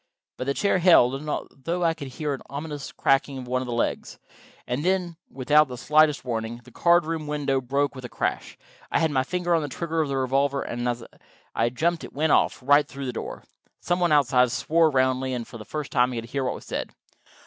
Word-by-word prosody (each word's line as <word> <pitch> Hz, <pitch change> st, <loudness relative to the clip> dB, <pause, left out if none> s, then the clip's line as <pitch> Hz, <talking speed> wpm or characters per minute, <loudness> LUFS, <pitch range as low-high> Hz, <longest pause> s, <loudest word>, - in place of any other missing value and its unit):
But 130 Hz, -, -5 dB
the 140 Hz, -, 0 dB
chair 200 Hz, -2 st, +2 dB
held, 150 Hz, -5 st, +4 dB
although 165 Hz, +5 st, -3 dB
I 165 Hz, -1 st, +3 dB
could 155 Hz, -4 st, -8 dB
hear 145 Hz, +3 st, -3 dB
an 135 Hz, -, -6 dB
ominous 145 Hz, 0 st, -6 dB
cracking 135 Hz, 0 st, +1 dB
of 125 Hz, -1 st, -7 dB
one 130 Hz, +1 st, 0 dB
of 130 Hz, -, -5 dB
the -, -, -4 dB
legs. 120 Hz, -, -2 dB, 0.5 s
And 125 Hz, +4 st, -2 dB
then, 180 Hz, -2 st, 0 dB
without 150 Hz, +3 st, +3 dB
the 125 Hz, -1 st, -7 dB
slightest 150 Hz, +1 st, +3 dB
warning, 115 Hz, -1 st, -3 dB
the 125 Hz, -, -16 dB
card 170 Hz, +5 st, +3 dB
room 160 Hz, -2 st, -3 dB
window 145 Hz, -3 st, 0 dB
broke 140 Hz, +3 st, 0 dB
with 130 Hz, -2 st, -9 dB
a 125 Hz, -, -6 dB
crash. -, -, -3 dB, 0.3 s
I -, -, +2 dB
had 160 Hz, -1 st, +1 dB
my 130 Hz, -2 st, +2 dB
finger 175 Hz, +5 st, -1 dB
on 165 Hz, -, +3 dB
the 150 Hz, -, -3 dB
trigger 160 Hz, +5 st, -2 dB
of 150 Hz, -, -1 dB
the 135 Hz, -, -1 dB
revolver, 135 Hz, +2 st, +1 dB
and 120 Hz, +1 st, -3 dB
as 120 Hz, -1 st, -3 dB, 0.5 s
I 115 Hz, +1 st, +1 dB
jumped 165 Hz, +7 st, -1 dB
it -, -, -9 dB
went 155 Hz, +2 st, +1 dB
off, -, -, +2 dB
right 145 Hz, +2 st, +5 dB
through 140 Hz, -1 st, -7 dB
the 125 Hz, -, -3 dB
door. -, -, -6 dB, 0.4 s
Some 175 Hz, +1 st, -1 dB
one 175 Hz, -2 st, +2 dB
outside 125 Hz, -4 st, +4 dB
swore 160 Hz, +5 st, +2 dB
roundly, 130 Hz, -1 st, +1 dB
and 120 Hz, -2 st, -5 dB
for 120 Hz, -, -10 dB
the 105 Hz, -, -9 dB
first 150 Hz, +2 st, -5 dB
time 125 Hz, +1 st, +2 dB
I -, -, -5 dB
could 115 Hz, 0 st, -6 dB
hear 140 Hz, 0 st, -1 dB
what -, -, -1 dB
was -, -, -11 dB
said. -, -, -4 dB
140 Hz, 230 wpm, -25 LUFS, 125-155 Hz, 0.5 s, right